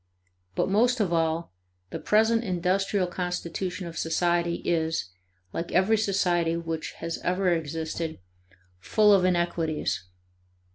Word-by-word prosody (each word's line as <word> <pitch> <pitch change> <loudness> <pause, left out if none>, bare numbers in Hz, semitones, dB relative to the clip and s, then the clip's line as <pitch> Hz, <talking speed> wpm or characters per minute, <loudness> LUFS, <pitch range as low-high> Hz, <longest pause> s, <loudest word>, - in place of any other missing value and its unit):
But, - - +1
most 235 +6 +3
of 190 -5 +1
all, 165 - 0 0.4
the - - -4
present 225 +2 +3
industrial 185 +1 +1
constitution 180 +1 -3
of 170 -1 -6
society 170 +1 +1
is, 160 - 0 0.4
like 170 - -4
every 190 +5 +4
society 180 -5 +1
which 165 -1 -4
has 165 0 -5
ever 185 +1 +1
existed, 160 0 -3 0.6
full 210 - +4
of 190 -2 +4
inequities. 170 - 0
175 Hz, 115 wpm, -27 LUFS, 165-195 Hz, 0.6 s, every